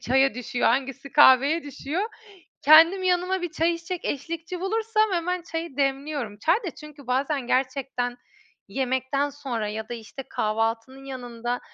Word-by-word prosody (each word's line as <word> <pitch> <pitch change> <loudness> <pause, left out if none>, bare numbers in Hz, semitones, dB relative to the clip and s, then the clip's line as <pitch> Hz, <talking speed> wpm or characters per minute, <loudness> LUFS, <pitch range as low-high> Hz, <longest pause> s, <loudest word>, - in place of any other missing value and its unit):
çaya 265 +1 +3
düşüyor, 245 0 -1
hangisi 270 +2 -1
kahveye 290 +3 +6
düşüyor. 290 +5 -4 0.6
Kendim 330 +6 +7
yanıma 365 +1 +1
bir 350 -2 -3
çay 330 +2 +1
içecek 335 +1 -5
eşlikçi 335 +5 -4
bulursam 435 +2 +1
hemen 355 +1 -1
çayı 330 -4 -6
demliyorum. 275 -5 -1
Çay 325 - +3
da 405 -8 -4
çünkü 295 -3 -12
bazen 270 +1 0
gerçekten 255 -1 -1 0.5
yemekten 265 +2 -1
sonra 255 -7 -4
ya 220 +1 -5
da, 240 - -3
işte, 235 +4 -8
kahvaltının 225 +5 -2
yanında 245 -2 -4
275 Hz, 140 wpm, -25 LUFS, 250-335 Hz, 0.6 s, Kendim